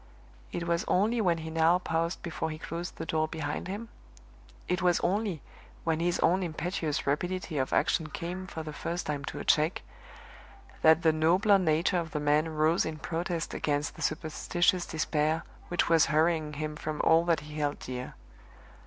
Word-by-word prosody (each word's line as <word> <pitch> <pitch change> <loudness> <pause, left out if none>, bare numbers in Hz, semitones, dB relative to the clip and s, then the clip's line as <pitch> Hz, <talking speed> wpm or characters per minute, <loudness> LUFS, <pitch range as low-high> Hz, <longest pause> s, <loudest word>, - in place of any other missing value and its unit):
It 170 - -3
was 170 0 +1
only 220 +5 +2
when 175 -4 +2
he 160 0 -6
now 165 +2 +4
paused 165 -1 -2
before 160 -1 -3
he 155 - -5
closed 170 +2 -6
the 160 - -5
door 155 -1 0
behind 155 -1 -4
him 210 +4 -5 0.8
it 180 +1 0
was 175 -1 +3
only 195 -4 0 0.4
when 165 -1 0
his 175 +1 0
own 185 +3 +3
impetuous 170 -2 -2
rapidity 170 +2 -1
of 130 - -1
action 160 -3 +2
came 180 +3 -5
for 160 -3 -6
the 155 -1 -6
first 170 +3 -3
time 145 -2 -3
to - - -6
a - - -5
check, 155 +3 +2 1.0
that 160 +2 +6
the 160 -1 +5
nobler 185 +6 +4
nature 170 +1 +2
of 165 -1 -5
the 150 - -1
man 150 +2 +2
rose 155 +3 +3
in 160 -1 -4
protest 170 +1 -3
against 145 0 -1
the - - -10
superstitious 175 +3 0
despair 155 +1 0 0.2
which 175 - +1
was 165 -2 +5
hurrying 155 -1 +2
him 150 +1 -4
from 155 0 -4
all 165 +1 +5
that 170 -2 +2
he 150 0 -8
held 145 -1 0
dear. 125 0 -6
165 Hz, 180 wpm, -29 LUFS, 155-175 Hz, 1.0 s, that